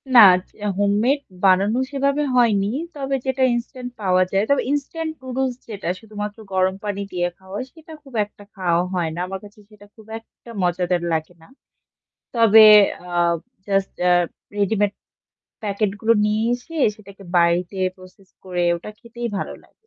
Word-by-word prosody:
না। - - +11 0.4
য - - -16 0.2
হোমমেড 210 +8 +2 0.3
বানানো 195 +5 +4
সেভাবে 280 +1 +1
হয়নি। 210 -5 +3 0.3
তবে 275 -1 -2
যেটা 265 0 0
ইনস্ট্যান্ট 245 +1 -5
পাওয়া 185 -2 +3
যায়। 195 +1 +2
তবে 280 - +3
ইনস্ট্যান্ট 315 +3 -2
নুডলস 260 0 -2
যেটা 205 -6 -6
শুধুমাত্র 210 0 -6 0.2
গরম 185 0 +2
পানি 200 -1 -2
দিয়ে 175 -1 0
খাওয়া 190 +1 -11
হয়, 255 - -4
সেটা 320 0 -13
খুব 270 -3 -16
একটা 205 0 -17
খাওয়া 175 -3 +1
হয় 175 -3 0
না। - - -5
আমার 190 +1 -5
কাছে 205 +1 -16
সেটা 210 -1 -17
খুব 220 - -16
একটা 230 +1 -17
মজাদার 180 0 0
লাগে 160 +2 -2
না। 160 - -17 0.9
তবে 225 -2 +7 0.4
অ্যাঁ 175 -1 +1 0.3
জাস্ট 195 -1 +1
এ্যা 180 0 +4 0.4
রেডিমেড 205 0 +1 0.7
প্যাকেট 205 0 0
গুলো 225 +1 +4
নিয়ে 210 +1 +1
এসে 250 +7 -9 0.2
সেটাকে 200 -2 -14
বাড়িতে 175 +2 +2 0.2
প্রসেস 185 +1 -17 0.2
করে 180 -1 -2
ওটা 175 +5 -9
খেতেই 235 0 -6
ভালো - - -4
লাগে। - - -26
205 Hz, 155 wpm, -21 LUFS, 185-240 Hz, 0.9 s, না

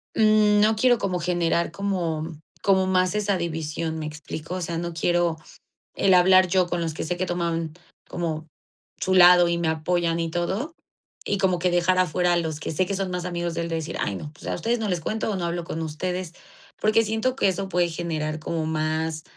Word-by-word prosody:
mm, 215 -1 +4
no 215 +1 +4
quiero 245 +2 +4
como 185 -4 -2
generar 170 -1 0
como 170 -5 -2 0.2
como 190 -1 +3
más 185 +1 +2
esa 205 -2 +1
división, 160 -1 -3
¿me 155 - -4
explico? 155 +2 -6
O 185 - -4
sea, 170 -1 -3
no 170 0 -4
quiero 170 0 +1 0.6
el 195 - +3
hablar 185 +1 +6
yo 185 0 +2
con 175 0 -2
los 165 -2 -2
que - - -4
sé 175 +2 -2
que 185 - -1
toman 170 -2 -2 0.3
como 160 -2 -4 0.5
su 190 - 0
lado 175 -1 +7
y 170 - 0
me 170 -1 -1
apoyan 165 +1 0
y 165 -1 -2
todo, 190 - -2 0.5
y 200 - 0
como 185 -2 +1
que 180 +1 +1
dejar 175 +1 +2
afuera 180 0 +2
a - - +3
los 160 -3 -2
que - - -3
sé 175 +4 +1
que 200 - -3
son 190 -1 -2
más 180 0 -3
amigos 175 -1 -3
de 170 - -1
él, - - -3
de 165 - -2
decir: 160 0 -4
"Ay, 100 - -1
no, 150 +9 -7
pues - - -12
a - - -1
ustedes 230 +7 -1
no 220 - -2
les 180 -3 -1
cuento 220 +6 -2
o 210 - -1
no 180 -2 -2
hablo 170 0 -3
con 165 -1 -4
ustedes", 180 +3 -4 0.5
porque 215 +1 +3
siento 220 +4 -1
que 200 - +2
eso 190 +1 -3
puede 175 -1 +1
generar 160 -2 -3
como 160 +1 -3
más 155 0 -2
175 Hz, 220 wpm, -24 LUFS, 165-185 Hz, 0.6 s, lado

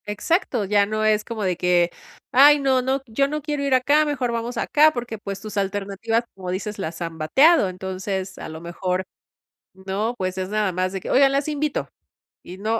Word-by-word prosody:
Exacto, 235 - 0
ya 200 0 +3
no 215 +1 -2
es 215 -1 +2
como 225 -2 -5
de 180 -3 0
que: 175 -1 +2 0.4
"Ay 290 +3 +7
no, 265 -2 +2
no 265 +2 -1
yo 260 +4 0
no 300 +1 -3
quiero 295 -1 -2
ir 275 -2 +3
acá, 285 +4 +3
mejor 275 -5 -1
vamos 235 +1 -3
acá", 305 +6 +4
porque, 240 -5 -5
pues, 200 -1 -6
tus 215 -1 -7
alternativas, 200 +3 -1
como 185 -2 -7
dices, 200 +3 -4
las 165 -2 -5
han 165 -1 -5
bateado. 270 - +4
Entonces 190 +1 -5
a - - -7
lo 160 0 -8
mejor, 180 +2 -2 0.7
¿no?, 195 +5 -3
pues 185 -2 -3
es 185 0 -3
nada 210 -1 0
más 185 +1 -1
de 195 - -4
que: - - -7
"Oigan, 275 0 +5
las 275 +2 0
invito", 300 -1 -2 0.5
y 180 +2 -10
no, 220 +3 -1
210 Hz, 200 wpm, -22 LUFS, 190-265 Hz, 0.7 s, Ay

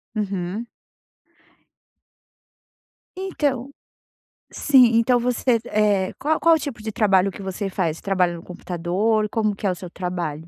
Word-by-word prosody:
Uhum. 200 +1 -3 2.5
Então, 280 -8 -2 0.8
sim. 265 -4 +5
Então 240 +2 +3
você, 245 0 +1
eh, 205 -4 +1
qual 310 +2 0
qual 335 -1 +5
o - - -1
tipo 280 -6 -6
de 220 0 -4
trabalho 195 -3 +3
que 195 - -9
você 195 +1 -4
faz? 170 -4 -2
Trabalha 185 -3 +1
no 170 - -8
computador? 185 +5 -1
Como 215 -1 0
que 200 - -3
é - - +2
o - - -3
seu 180 0 -9
trabalho? 170 -4 -4
205 Hz, 140 wpm, -22 LUFS, 180-240 Hz, 2.5 s, sim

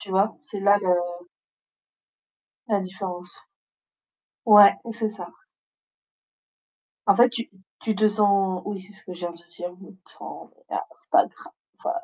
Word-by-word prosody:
Tu 195 - -10
vois, 195 +3 +2
c'est 205 - -8
là 200 +1 +4
le 175 -2 -1 1.4
la 205 -2 +2
différence. 185 -2 -7 1.0
Ouais, 210 -2 +9 0.2
c'est 220 -1 -2
ça. 185 -5 -9 1.8
En - - +5
fait, 240 +1 +7
tu 235 0 -5 0.3
tu 220 -2 -1
te 215 +2 +4
sens 200 -3 +2
oui, 205 -1 -5
c'est 190 +3 -15
ce 190 - -14
que 185 - -8
je 175 - -10
viens 175 -1 -4
te 170 0 -16
dire, 175 +1 -6
tu 190 +1 -15
te - - -10
sens - - -10 0.2
ah - - -2 0.2
c'est - - -28
pas - - +5
grave 350 0 -8
195 Hz, 155 wpm, -24 LUFS, 180-210 Hz, 1.8 s, Ouais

